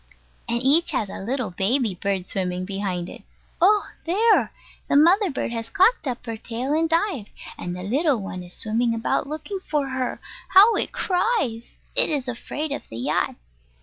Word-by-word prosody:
And 235 Hz, +1 st, +1 dB
each 300 Hz, +6 st, +5 dB
has 205 Hz, -3 st, -1 dB
a -, -, -7 dB
little 235 Hz, 0 st, -3 dB
baby 215 Hz, +4 st, +1 dB
bird 190 Hz, 0 st, -2 dB
swimming 185 Hz, -1 st, -3 dB
behind 190 Hz, -3 st, -3 dB
it. -, -, -10 dB, 0.4 s
Oh! 410 Hz, +3 st, +4 dB, 0.2 s
there: 425 Hz, +7 st, +3 dB, 0.4 s
the -, -, +1 dB
mother 350 Hz, +6 st, +5 dB, 0.2 s
has 230 Hz, -1 st, -5 dB
cocked 395 Hz, -, +3 dB
up 250 Hz, -1 st, -4 dB
her 230 Hz, -2 st, -4 dB
tail 245 Hz, +5 st, -3 dB
and 325 Hz, +1 st, +1 dB
dived, 330 Hz, -, 0 dB, 0.3 s
and 175 Hz, 0 st, -5 dB
the 180 Hz, -, -6 dB
little 275 Hz, -, +1 dB
one 190 Hz, -2 st, -6 dB
is 175 Hz, 0 st, -9 dB
swimming 230 Hz, +2 st, 0 dB
about 230 Hz, +4 st, -1 dB
looking 315 Hz, +7 st, -5 dB
for 295 Hz, -6 st, -2 dB
her! 260 Hz, -1 st, -3 dB, 0.4 s
How 415 Hz, +4 st, +9 dB
it -, -, -1 dB
cries! 360 Hz, -, -1 dB, 0.2 s
It -, -, +5 dB
is 285 Hz, -4 st, +1 dB
afraid 285 Hz, +5 st, -4 dB
of 285 Hz, -, -3 dB
the 115 Hz, -, -8 dB
yacht. 120 Hz, -, 0 dB
255 Hz, 175 wpm, -23 LUFS, 200-330 Hz, 0.4 s, How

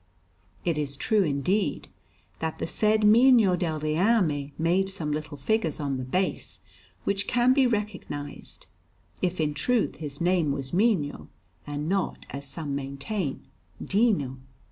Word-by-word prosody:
It 165 Hz, -3 st, +1 dB
is 140 Hz, -1 st, -2 dB
true, 215 Hz, -, +2 dB
indeed, 180 Hz, +5 st, 0 dB, 0.5 s
that 160 Hz, -1 st, -3 dB
the -, -, -2 dB
said 215 Hz, +4 st, +2 dB
Mino 225 Hz, -2 st, +6 dB
del 165 Hz, -4 st, -2 dB
Reame 155 Hz, -2 st, +1 dB
made 180 Hz, +4 st, +2 dB
some 165 Hz, -6 st, -2 dB
little 150 Hz, -1 st, -4 dB
figures 165 Hz, 0 st, 0 dB
on 140 Hz, -3 st, -1 dB
the 130 Hz, -, -4 dB
base, 185 Hz, +9 st, -2 dB, 0.4 s
which 200 Hz, 0 st, -1 dB
can 245 Hz, +1 st, +4 dB
be 265 Hz, -1 st, +4 dB
recognized; 205 Hz, -10 st, -4 dB, 0.6 s
if 180 Hz, -1 st, -1 dB
in 150 Hz, -1 st, +1 dB
truth 230 Hz, -, 0 dB
his 145 Hz, -3 st, -6 dB
name 175 Hz, -4 st, +2 dB
was 135 Hz, 0 st, -4 dB
Mino, 185 Hz, -7 st, +1 dB, 0.4 s
and 145 Hz, +1 st, -3 dB
not, 195 Hz, +1 st, -1 dB
as 140 Hz, +1 st, -6 dB
some 145 Hz, +1 st, -5 dB
maintain, 140 Hz, +4 st, -3 dB, 0.3 s
Dino. 195 Hz, -, +1 dB
170 Hz, 140 wpm, -27 LUFS, 145-210 Hz, 0.6 s, Mino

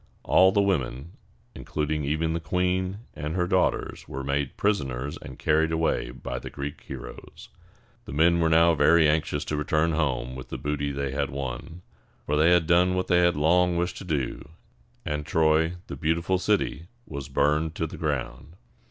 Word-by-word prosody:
All 95 Hz, +1 st, +5 dB
the 100 Hz, 0 st, +3 dB
women, 75 Hz, -5 st, -1 dB, 0.4 s
including 75 Hz, -1 st, -3 dB
even 80 Hz, +3 st, 0 dB
the 85 Hz, -, -1 dB
queen 90 Hz, +4 st, -1 dB
and 75 Hz, +2 st, -4 dB
her 90 Hz, -1 st, +1 dB
daughters, 90 Hz, 0 st, 0 dB
were 70 Hz, +1 st, -5 dB
made 70 Hz, 0 st, -2 dB
prisoners 70 Hz, -10 st, -1 dB
and 65 Hz, -, -10 dB
carried 80 Hz, +1 st, +2 dB
away 80 Hz, -6 st, 0 dB
by 60 Hz, 0 st, -6 dB
the -, -, -8 dB
Greek 70 Hz, 0 st, -6 dB
heroes. -, -, -10 dB, 0.6 s
The -, -, -8 dB
men 85 Hz, +4 st, +3 dB
were 80 Hz, -1 st, +2 dB
now 85 Hz, +1 st, +5 dB
very 80 Hz, 0 st, +5 dB
anxious 75 Hz, -1 st, 0 dB
to 75 Hz, -, -2 dB
return 75 Hz, +2 st, +1 dB
home 65 Hz, -6 st, -1 dB
with 65 Hz, -1 st, -9 dB
the -, -, -4 dB
booty 70 Hz, -1 st, -2 dB
they 70 Hz, -1 st, -3 dB
had 70 Hz, +1 st, -1 dB
won; 70 Hz, +6 st, -6 dB, 0.4 s
for 75 Hz, -, 0 dB
they 75 Hz, +3 st, +4 dB
had 85 Hz, -2 st, +4 dB
done 90 Hz, +2 st, +3 dB
what 95 Hz, 0 st, -2 dB
they 90 Hz, -, +5 dB
had 85 Hz, 0 st, +3 dB
long 85 Hz, +3 st, +3 dB
wished 85 Hz, +1 st, -1 dB
to -, -, -7 dB
do, 75 Hz, -5 st, -3 dB, 0.6 s
and 75 Hz, 0 st, -2 dB
Troy, 80 Hz, +2 st, +2 dB
the -, -, -7 dB
beautiful 85 Hz, +6 st, 0 dB
city, 90 Hz, -5 st, 0 dB, 0.2 s
was 70 Hz, -1 st, -7 dB
burned 75 Hz, +3 st, +1 dB
to 80 Hz, -, -1 dB
the 80 Hz, -, -7 dB
ground. 70 Hz, 0 st, -4 dB
80 Hz, 180 wpm, -26 LUFS, 70-85 Hz, 0.6 s, All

